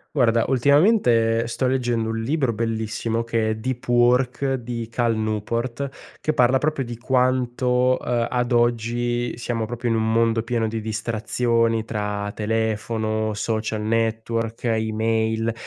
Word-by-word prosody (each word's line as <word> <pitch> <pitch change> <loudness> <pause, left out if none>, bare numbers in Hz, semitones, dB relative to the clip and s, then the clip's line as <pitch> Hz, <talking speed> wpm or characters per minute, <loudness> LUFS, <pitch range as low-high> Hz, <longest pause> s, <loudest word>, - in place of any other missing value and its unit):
Guarda, 115 -3 +3
ultimamente 125 - +3
sto 120 +3 -2
leggendo 120 -3 0
un 115 0 -2
libro 135 0 0
bellissimo 115 +1 -2
che 115 -1 0
è 110 - 0
Deep 120 +3 -4
Work 125 +2 +2
di 120 -2 -5
Cal 115 0 0
Newport, 115 +5 -2 0.3
che 155 - 0
parla 125 -1 +4
proprio 150 -2 -1
di 120 -1 -7
quanto, 125 0 +1
ehm, 120 -1 -1
ad 125 0 -1
oggi 120 0 0
siamo 115 -2 -2
proprio 120 +1 -3
in 115 - +2
un 110 0 +1
mondo 115 0 +2
pieno 115 -1 -1
di 110 0 -3
distrazioni 115 +1 0
tra 105 -2 -3
telefono, 110 0 -1
social 110 0 -2
network, 115 +1 -1
email 110 0 0
115 Hz, 135 wpm, -23 LUFS, 110-125 Hz, 0.3 s, parla